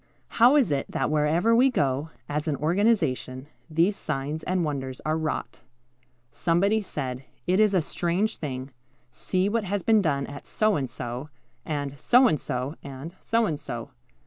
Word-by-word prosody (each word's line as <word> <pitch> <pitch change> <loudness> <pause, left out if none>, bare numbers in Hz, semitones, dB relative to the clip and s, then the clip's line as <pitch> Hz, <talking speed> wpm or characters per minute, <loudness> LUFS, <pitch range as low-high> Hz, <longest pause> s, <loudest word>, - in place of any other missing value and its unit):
How 245 +5 +8
is 265 - +4
it 140 -1 0
that - - -1
wherever 160 +9 +3
we 255 +3 +5
go, 145 - 0 0.2
as 150 +2 -2
an 150 - +1
organization, 155 - +1 0.2
these 170 +6 +2
signs 150 0 -3
and 180 -1 0
wonders 135 -3 -4
are 155 +1 +1
wrought? 160 -1 -3 0.7
Somebody 195 +6 +2
said, 130 -9 -4 0.2
"It 185 +3 +2
is 210 -2 +4
a 175 - +3
strange 175 +7 -1
thing; 130 -2 -5 0.4
see 185 +8 0
what 220 0 0
has 200 0 -2
been 220 -2 +4
done 140 -6 0
at 145 0 -9
So 215 -1 +2
and 135 -4 -2
so, 120 +4 -6 0.4
and 145 -2 -3
So 250 +9 +5
and 155 - +1
so, 125 +3 -3
and 140 +4 -8
So 230 0 +2
and 155 -7 -2
so. 120 -6 -6
155 Hz, 170 wpm, -26 LUFS, 140-200 Hz, 0.7 s, How